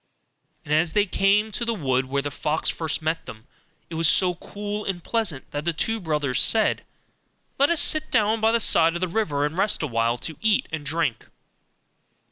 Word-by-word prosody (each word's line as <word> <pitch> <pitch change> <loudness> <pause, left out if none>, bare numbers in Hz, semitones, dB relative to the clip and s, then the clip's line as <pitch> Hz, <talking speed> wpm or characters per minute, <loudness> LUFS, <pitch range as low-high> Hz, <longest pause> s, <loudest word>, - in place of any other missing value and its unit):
And 150 - -2
as 160 +1 +1
they 205 -1 +3
came 205 +3 +1
to 235 - -4
the 230 -1 -1
wood 130 -7 0
where 140 +1 -2
the 145 - -4
fox 150 +4 0
first 160 -1 -4
met 160 +1 -2
them, 110 +1 -11 0.4
it - - -11
was 160 -1 +2
so 180 -2 +4
cool 205 +4 -6
and 180 -4 -4
pleasant 210 - -2
that 145 0 -4
the 170 +1 -1
two 225 +8 -1
brothers 150 - -1
said, 220 -1 +3 0.8
'Let 280 - +4
us 340 -2 +3
sit 310 0 +1
down 220 -1 +1
by 220 0 +3
the 235 - +2
side 165 -5 +4
of 175 - -4
the 185 - 0
river, 165 -7 -1
and 150 +2 -4
rest 195 -2 +1
a - - -1
while, 115 -1 0
to 160 +4 -5
eat 220 -2 +2
and 160 -2 -4
drink. 145 -5 -2
170 Hz, 205 wpm, -24 LUFS, 150-210 Hz, 0.8 s, so